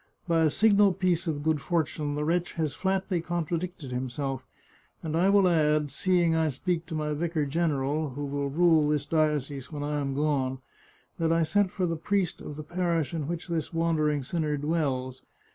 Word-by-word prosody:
By 165 -1 +3
a 160 - +4
signal 205 +2 +4
piece 185 -1 0
of 145 -3 -2
good 155 -2 +1
for 170 +1 +1
tune 145 -1 -4
the 150 - -1
wretch 175 +2 0
has 155 -4 -1
flatly 190 -2 -1
contradicted 170 -3 -3
himself, 130 +1 -3 0.6
and 160 -1 -2
I 180 +4 +3
will 200 -1 +5
add, 150 -3 +2
seeing 175 +2 +2
I 160 -1 +2
speak 165 +4 -2
to 160 - -5
my 150 -1 -1
vicar 160 0 -1
general, 150 -1 0
who 145 0 -3
will 140 0 -2
rule 160 0 +4
this 150 -1 0
diocese 145 -4 0
when 145 -2 -4
I 150 0 -1
am 135 -1 -2
gone, 140 -3 0 0.6
that 165 -1 +2
I 165 0 +3
sent 200 +4 +2
for 185 0 -1
the 165 -1 -1
priest 190 +2 -1
of 150 - -7
the 155 - -6
parish 170 -1 -1
in 155 -4 -3
which 170 +1 -4
this 165 -1 -3
wandering 155 -3 +1
sinner 150 +1 -1
dwells. 140 -4 -1
160 Hz, 190 wpm, -28 LUFS, 145-170 Hz, 0.6 s, will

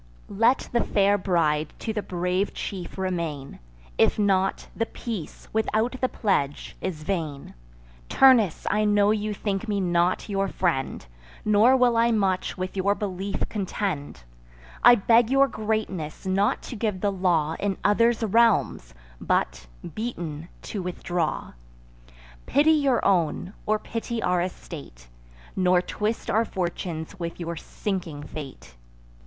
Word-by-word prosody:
Let 230 +6 +2
the 235 - +2
fair 200 0 +3
bride 155 -5 +1
to 220 - -4
the 210 - -1
brave 180 +1 -1
chief 190 -2 -6
remain; 170 -7 -3 0.4
If - - +4
not, 195 -2 +1
the 230 - -1
peace, 215 -11 -7
without 220 +3 0
the 255 - +2
pledge, 145 -10 -1
is 165 -5 -4
vain. 155 -6 -3 0.6
Turnus, 240 -10 +5
I 210 +1 +2
know 205 0 +4
you 215 0 -1
think 200 +1 -3
me 205 -2 0
not 175 -1 +1
your 195 -1 0
friend, 170 - -1 0.4
Nor 215 +5 +5
will 245 -2 +3
I 230 +1 +4
much 195 -5 0
with 185 +1 -4
your 200 +1 +1
belief 195 -1 -3
contend: 185 - -3 0.6
I 245 - +9
beg 230 +2 +4
your 275 +1 +5
greatness 215 - -3
not 195 +2 +1
to - - -7
give 210 -4 -2
the 205 - +1
law 170 -5 +1
In 200 -2 -1
others' 230 +2 +3
realms, 195 - +2 0.3
but, - - -1 0.3
beaten, 170 -8 -5
to 205 - -4
withdraw. 175 -2 -3 0.9
Pity 295 +3 +4
your 280 -6 +2
own, 180 0 +1
or 215 0 +3
pity 230 +2 -4
our 180 -1 +2
estate; 145 - -8 0.5
Nor 180 -1 +4
twist 210 +5 -3
our 220 +2 +3
fortunes 175 -3 -4
with 170 0 -5
your 170 0 -4
sinking 170 -5 -4
fate. 135 - -9
195 Hz, 135 wpm, -25 LUFS, 170-215 Hz, 0.9 s, I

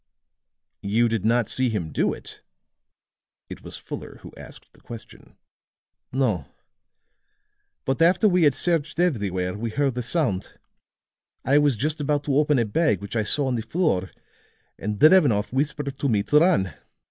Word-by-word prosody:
"You 110 +4 +2
did 110 -3 -2
not 115 -1 +2
see 130 -1 0
him 90 -8 -3
do - - +1
it?" - - -10 1.1
It - - -8
was - - -7
Fuller - - -8
who - - -11
asked - - -14
the - - -22
question. 115 -1 -12 0.7
"No; 110 - 0 1.4
but 135 +4 -1
after 175 +5 +4
we 180 -2 +2
had 145 - +3
searched 165 -3 -1
everywhere, 100 - 0
we 115 +3 -4
heard 135 +1 0
a 125 - -2
sound; 120 - -2 0.9
I 140 +3 +4
was 145 -5 +2
just 150 +5 -2
about 145 0 0
to 140 - -1
open 150 -1 +3
a 120 - +2
bag 160 +9 +1
which 100 +3 -8
I 110 - +2
saw 135 +7 0
on 130 - -1
the 115 - -1
floor 110 - -1 0.7
and 105 +1 -3
Drevenoff 140 - +4
whispered 140 0 -2
to 140 - 0
me 105 -4 +1
to 150 - +4
run. 150 - +2
130 Hz, 160 wpm, -24 LUFS, 105-150 Hz, 1.4 s, after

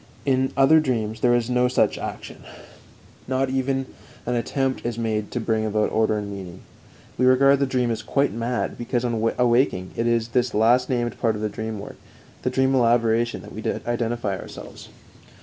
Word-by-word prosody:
In 130 -1 +1
other 140 +4 +6
dreams 115 -7 -2
there 120 +1 +3
is 120 -1 0
no 125 0 +2
such 125 - +2
action; - - -7 0.9
not 130 0 0
even 135 0 0 0.4
an 125 - -1
attempt 130 +3 -1
is 120 -1 -3
made 110 -2 -2
to 125 - -3
bring 110 -1 0
about 105 0 0
order 110 -1 +1
and 105 -1 -4
meaning. 95 -2 -8 0.6
We 125 - +4
regard 135 +2 +5
the 140 - +1
dream 125 -2 0
as 110 -1 -3
"quite 140 +2 0
mad," 115 +2 -2
because 120 +1 -1
on 120 - -1 0.2
awaking 120 -7 +2
it 115 - 0
is 115 -1 +2
with - - -24
this 125 -1 +1
last 120 +4 +3
named 120 -2 -1
part 115 -3 +1
of 105 - -5
the 105 - 0
dream 110 +1 -5
work, 100 - -9 0.4
the 125 - 0
dream 130 +1 +1
elaboration, 120 -1 +2
that - - -11
we - - -6
identify 120 -4 -2
ourselves. - - -10
120 Hz, 185 wpm, -23 LUFS, 110-130 Hz, 0.9 s, other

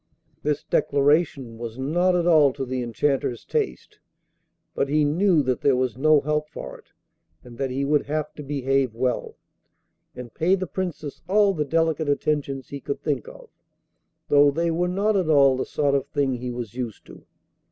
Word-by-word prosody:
This 150 0 -1
declaration 140 -4 +1
was 115 0 -6
not 175 +7 +1
at 175 -1 +1
all 155 -6 +5
to 135 -1 -4
the 130 0 -3
Enchanter's 120 +1 -1
taste; 60 - -3 0.7
but 140 - -1
he 150 +1 +2
knew 165 +1 +3
that 130 -1 -1
there 140 -2 +3
was 125 -3 -1
no 150 +2 +4
help 150 +1 -1
for - - -8
it, - - -22 0.6
and 120 -1 -13
that 135 -1 -1
he 135 +2 -2
would 145 0 +1
have 155 +1 -2
to - - -9
behave 135 -3 -1
well, 125 +1 -2 0.8
and 125 -2 -9
pay 180 +4 +2
the 185 -1 -3
Princess 170 -4 -5
all 200 0 +4
the 150 -4 -1
delicate 160 0 0
attentions 140 -2 -1
he 140 - -6
could 140 - -4
think 140 -7 -2
of; - - -12 0.8
though 145 0 +5
they 165 +4 0
were 175 +2 0
not 200 +4 +1
at 185 -5 +1
all 140 -3 +5
the 130 - -3
sort 145 -2 0
of 140 0 0
thing 140 -3 0
he 125 0 -4
was 120 -3 -6
used 120 -3 -6
to. - - -14
145 Hz, 185 wpm, -24 LUFS, 130-155 Hz, 0.8 s, all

